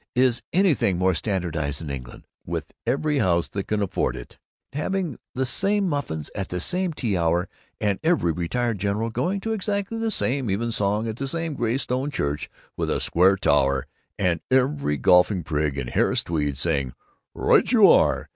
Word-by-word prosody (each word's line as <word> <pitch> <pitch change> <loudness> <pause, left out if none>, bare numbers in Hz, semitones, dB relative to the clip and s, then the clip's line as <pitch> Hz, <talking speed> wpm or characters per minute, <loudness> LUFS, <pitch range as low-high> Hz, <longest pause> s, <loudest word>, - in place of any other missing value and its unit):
Is 125 -1 +3
anything 155 - +2
more 95 +1 +2
standardized 80 -6 -2
than 80 -4 -6
England, 65 -3 -8 0.2
with - - -5 0.2
every 150 +1 +1
house 85 -6 +2
that 100 -1 -4
can 105 -1 0
afford 100 - -1
it - - -11 0.3
having 175 0 -2 0.2
the 130 +1 0
same 195 +9 +1
muffins 140 - -3
at 100 -2 -4
the 90 - -3
same 180 - 0
tea 120 -10 -2
hour, 85 +1 +1 0.3
and 100 -2 0
every 160 - +2
retired 105 +7 -1
general 105 +3 -1
going 175 - -1
to 225 +2 -2
exactly 205 +1 -2
the 225 0 0
same 135 - 0
evensong 105 0 0
at 110 0 -4
the 135 - -3
same 165 +2 -2
gray 120 -2 0
stone 130 +1 -2
church 75 - -2 0.3
with - - -2
a - - 0
square 95 +3 +4
tower, 70 -7 +2 0.3
and 90 -4 +1
every 130 - +1
golfing 90 - +4
prig 75 -2 -1
in 70 - -2
Harris - - +1
tweeds 75 -4 -2
saying 70 -5 0 0.4
'Right - - +3
you - - +7
are! - - +3
105 Hz, 175 wpm, -24 LUFS, 85-140 Hz, 0.4 s, you